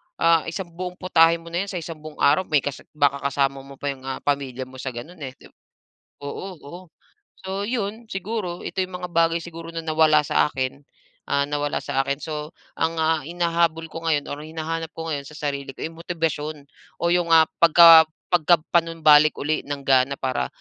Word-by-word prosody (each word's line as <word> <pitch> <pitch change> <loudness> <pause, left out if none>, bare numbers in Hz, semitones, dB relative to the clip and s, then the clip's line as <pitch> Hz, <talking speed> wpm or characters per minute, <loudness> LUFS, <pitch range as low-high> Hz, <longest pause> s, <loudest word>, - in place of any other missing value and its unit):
ah, 165 -1 +3
isang 170 +1 -5
buong 180 +1 -6
putahe 165 -2 +4
mo 170 0 -11
na 175 +3 -1
'yon - - -7
sa - - -7
isang 165 -2 -6
buong 155 0 -10
araw. 150 +6 +3
May 150 -3 +2
kasa 145 0 -6
baka 140 -1 +2
kasama 135 0 0
mo 135 +1 -12
pa 140 +1 -3
yung, 135 -1 -10
ah, 135 - -5
pamilya 135 -3 -1
mo 130 0 -12
sa, 130 -2 -5
gano'n, 165 +8 -9
eh, 135 -2 -7
di - - -18
ba? - - -58 0.7
Oo, 145 +6 -5 0.2
oo, 160 +5 -9 0.6
so 190 +1 -3
'yon 225 -1 -3
siguro. 195 -3 -4
Ito - - -4
yung 180 -1 -7
mga 180 - -4
bagay 165 0 +2
siguro 165 -1 -9
na 165 0 -4
nawala 155 -1 +4
sa 145 - +2
akin, 130 +1 -3 0.5
ah, 140 - +1
nawala 145 0 -1
sa 135 -1 0
akin. 140 +1 -1
So, 150 -1 -5 0.3
ang, 165 +1 0
ah, 160 0 +2
hinahabol 170 -1 0
ko 165 - -7
ngayon 150 -3 +1
or 145 - -5
hinahanap 160 +1 -4
ko 165 0 -5
ngayon 140 -2 -4
sa 150 - -12
sarili 140 -2 -3
ko, - - -11
eh, 160 - -4
motibasyon 160 -3 -3 0.4
o 170 - +2
yung, 175 -1 +2
ah, 160 -1 +7
pagka 165 -1 +9 0.2
pagka 175 -1 +4
panumbalik 155 -3 +5
uli 155 +2 -1
ng 145 -1 -4
gana 135 +1 +3
para, 130 - -1
160 Hz, 200 wpm, -23 LUFS, 140-170 Hz, 0.7 s, pagka